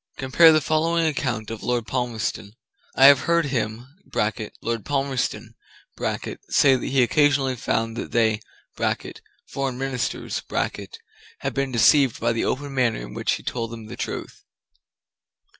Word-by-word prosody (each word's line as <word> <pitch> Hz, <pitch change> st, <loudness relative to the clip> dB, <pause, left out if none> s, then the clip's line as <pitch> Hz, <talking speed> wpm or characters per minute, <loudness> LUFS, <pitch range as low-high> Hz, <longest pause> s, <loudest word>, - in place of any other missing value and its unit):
Compare 135 Hz, +5 st, +6 dB
the 155 Hz, 0 st, +4 dB
following 165 Hz, +3 st, +1 dB
account 120 Hz, -8 st, -2 dB
of 115 Hz, -, -6 dB
Lord 120 Hz, -2 st, -1 dB
Palmerston: 115 Hz, -5 st, -3 dB, 0.4 s
"I 135 Hz, -, +6 dB
have 140 Hz, -1 st, +9 dB
heard 170 Hz, +1 st, +1 dB
him 120 Hz, -3 st, -3 dB, 0.8 s
[Lord 115 Hz, -2 st, -2 dB
Palmerston] 135 Hz, -2 st, -2 dB, 1.0 s
say 135 Hz, -2 st, +5 dB
that 125 Hz, -, -3 dB
he 130 Hz, -1 st, +3 dB
occasionally 135 Hz, 0 st, +2 dB
found 115 Hz, -1 st, -1 dB
that -, -, -4 dB
they 110 Hz, -2 st, +2 dB, 1.1 s
[foreign 135 Hz, -2 st, -3 dB
ministers] 135 Hz, -2 st, -3 dB, 1.0 s
had -, -, -4 dB
been 135 Hz, -1 st, -1 dB
deceived 130 Hz, +1 st, +4 dB
by 115 Hz, +1 st, +1 dB
the 115 Hz, -, -1 dB
open 140 Hz, +1 st, -2 dB
manner 125 Hz, -4 st, +1 dB
in -, -, -8 dB
which -, -, 0 dB
he -, -, -5 dB
told 115 Hz, -2 st, -3 dB
them 115 Hz, -1 st, -9 dB
the 110 Hz, -, -8 dB
truth." -, -, -6 dB
130 Hz, 140 wpm, -23 LUFS, 115-140 Hz, 1.1 s, have